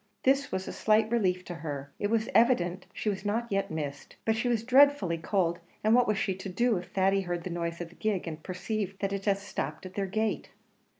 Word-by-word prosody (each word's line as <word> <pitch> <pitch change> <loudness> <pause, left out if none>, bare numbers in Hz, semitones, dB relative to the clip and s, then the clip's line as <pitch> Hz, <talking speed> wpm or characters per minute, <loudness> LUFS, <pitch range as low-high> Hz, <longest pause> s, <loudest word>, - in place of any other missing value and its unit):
This 275 +1 +3
was 190 0 -2
a - - -4
slight 215 +1 +3
relief 185 -6 +1
to 175 - -5
her 145 -4 -6
it 205 - 0
was 225 0 +1
evident 185 -7 +3
she - - -6
was 195 -2 -1
not 215 +3 0
yet 195 0 0
missed; 145 -3 -5
but 220 - +3
she 235 +3 -1
was 235 -2 +1
dreadfully 260 - +5
cold, 170 -1 0 0.2
and 215 +1 +4
what 245 0 +5
was 210 -1 +1
she 195 0 0
to 190 +1 -7
do 235 +5 +2
if 175 - -6
Thady 195 +1 +2
heard 175 -2 -3
the 180 - -5
noise 170 0 -3
of 170 - -5
the - - -17
gig, 210 -5 -1
and 160 -1 -5
perceived 195 +2 -3
that 195 0 0
it 195 0 -3
had 200 -2 +3
stopped 200 -1 -5
at 185 - -8
their 195 0 -1
gate? 215 +3 -1
195 Hz, 235 wpm, -29 LUFS, 175-220 Hz, 0.2 s, dreadfully